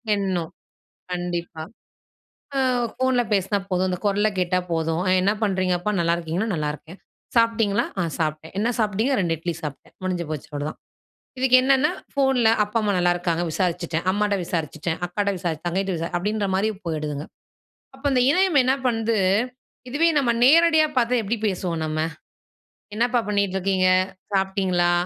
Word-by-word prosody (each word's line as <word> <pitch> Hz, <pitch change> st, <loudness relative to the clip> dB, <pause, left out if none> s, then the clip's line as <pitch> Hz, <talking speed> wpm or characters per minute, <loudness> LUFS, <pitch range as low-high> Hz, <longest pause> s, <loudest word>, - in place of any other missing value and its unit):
எண்ணம். 185 Hz, -5 st, -2 dB, 0.6 s
கண்டிப்பா. 175 Hz, -2 st, -4 dB, 0.9 s
அ, -, -, +2 dB, 0.4 s
ஃபோன்ல 260 Hz, -1 st, +2 dB
பேசினா 200 Hz, +1 st, +1 dB
போதும். 185 Hz, 0 st, +1 dB
அந்தக் 180 Hz, +3 st, -4 dB
குரல் 205 Hz, +2 st, +2 dB
கேட்டா 180 Hz, 0 st, +1 dB
போதும். 165 Hz, +1 st, 0 dB
அ, -, -, +3 dB
"என்ன 200 Hz, +2 st, +3 dB
பண்றீங்க 185 Hz, -3 st, +1 dB
அப்பா? 210 Hz, +4 st, -1 dB
நல்லாயிருக்கீங்கன்னா?" 170 Hz, +4 st, 0 dB
"நல்லாருக்கேன்." 155 Hz, +3 st, -4 dB, 0.4 s
"சாப்ட்டீங்களா?" 230 Hz, 0 st, +2 dB
"ஆ, -, -, +2 dB, 0.2 s
சாப்ட்டேன்." 155 Hz, +1 st, -3 dB
"என்ன 230 Hz, +3 st, +1 dB
சாப்ட்டீங்க?" 220 Hz, +5 st, +1 dB
"2 170 Hz, -3 st, +1 dB
இட்லி 170 Hz, +1 st, -3 dB
சாப்பிட்டேன்." 145 Hz, -2 st, -8 dB
முடிஞ்சு 180 Hz, -2 st, -2 dB
போச்சு, 150 Hz, -, -5 dB
அவ்ளோதான். 145 Hz, +2 st, -4 dB, 0.6 s
இதுக்கு 255 Hz, -1 st, +5 dB
என்னென்னா, 270 Hz, +2 st, +3 dB, 0.2 s
ஃபோன்ல 265 Hz, -5 st, +3 dB
அப்பா, 210 Hz, +3 st, -2 dB
அம்மா 205 Hz, -2 st, +1 dB
நல்லாருக்காங்க. 175 Hz, -1 st, +1 dB
விசாரிச்சுட்டேன். 170 Hz, -2 st, -1 dB
அம்மாட்ட 205 Hz, 0 st, +1 dB
விசாரிச்சுட்டேன். 165 Hz, 0 st, -3 dB
அக்காட்ட 200 Hz, +3 st, -1 dB
விசாரி 165 Hz, -3 st, -2 dB
தங்கைட்ட 190 Hz, +2 st, -1 dB
விசா 165 Hz, +1 st, -3 dB
அப்படின்ற 205 Hz, +2 st, -1 dB
மாதிரி, 210 Hz, +3 st, +1 dB, 0.2 s
போயிடுதுங்க. 150 Hz, -2 st, -3 dB, 0.7 s
அப்ப, 270 Hz, -, -20 dB
அந்த 255 Hz, -2 st, +3 dB
இணையம் 365 Hz, -4 st, +3 dB
என்ன 260 Hz, +1 st, +3 dB
பண்ணுது? 225 Hz, -1 st, 0 dB, 0.7 s
இதுவே 320 Hz, +6 st, +3 dB
நம்ம 240 Hz, -4 st, +2 dB
நேரடியா 320 Hz, +1 st, +6 dB
பாத்தா, 245 Hz, 0 st, +3 dB
எப்டி 225 Hz, +4 st, -1 dB
பேசுவோம் 175 Hz, -4 st, -2 dB
நம்ம? 155 Hz, 0 st, -2 dB, 1.0 s
"என்னப்பா 240 Hz, +1 st, +2 dB
பண்ணீட்டு 200 Hz, -2 st, 0 dB
இருக்கீங்க? 190 Hz, -1 st, +2 dB, 0.5 s
சாப்ட்டீங்களா? 190 Hz, -2 st, +1 dB
190 Hz, 140 wpm, -23 LUFS, 170-225 Hz, 1.0 s, நேரடியா